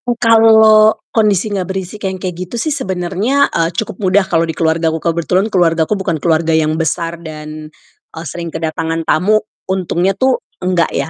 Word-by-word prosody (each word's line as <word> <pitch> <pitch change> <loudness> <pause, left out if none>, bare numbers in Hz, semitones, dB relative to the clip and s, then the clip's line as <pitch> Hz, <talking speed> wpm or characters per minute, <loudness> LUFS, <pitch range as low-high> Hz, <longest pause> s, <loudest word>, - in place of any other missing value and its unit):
Oh, 240 -1 0
kalau 220 -2 +5 0.2
kondisinya 205 -2 +1
berisik 190 +2 -4
yang 190 - -5
kayak 185 -1 -4 0.2
gitu - - -7
sih 305 +6 -1
sebenarnya, 205 - -1
eee, 165 -1 +1
cukup 185 +3 -5
mudah 190 0 +2
kalau 165 -3 0
di 160 - -3
keluargaku. 160 0 +1
Kebetulan 170 +3 0
keluargaku 165 -1 +2
bukan 190 -5 -2
keluarga 160 0 +1
yang 155 -1 +1
besar 165 +1 -2
dan, 155 -1 -8 0.4
eee, 160 +1 -9
sering 170 +3 -6
kedatangan 165 0 -3
tamu, 205 +8 +2 0.3
untungnya 190 0 0
tuh 260 +3 +1 0.2
nggak, 180 -2 0
ya. - - -2
180 Hz, 160 wpm, -15 LUFS, 165-205 Hz, 0.4 s, kalau